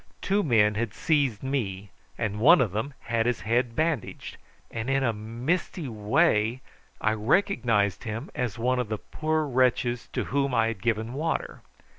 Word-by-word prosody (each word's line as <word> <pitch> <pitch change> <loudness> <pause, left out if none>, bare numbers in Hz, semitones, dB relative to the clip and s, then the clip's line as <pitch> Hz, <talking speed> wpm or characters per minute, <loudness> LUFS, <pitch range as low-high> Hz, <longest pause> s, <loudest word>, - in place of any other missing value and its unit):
Two 200 +1 +1
men 110 - +3
had 110 0 -3
seized 140 -9 +1
me, 105 -8 -3 0.3
and 105 -2 -2
one 155 +10 +7
of 120 -7 +1
them 110 +8 -3
had 115 0 0
his 120 -6 0
head 115 +3 0
bandaged, 155 -7 -2 0.3
and 115 +2 -4
in 135 0 +2
a 115 -3 +1
misty 125 - -3
way 110 +1 +1 0.4
I 110 - +2
recognised 115 - +1
him 115 +5 -5
as 125 -6 -3
one 125 +2 +1
of 120 -4 -2
the 110 - -1
poor 155 +6 -2
wretches 125 -2 +1
to - - -1
whom 140 -1 0
I 115 0 +3
had 110 -4 -6
given 115 +1 -1
water. 160 +4 -2
120 Hz, 165 wpm, -27 LUFS, 110-135 Hz, 0.4 s, one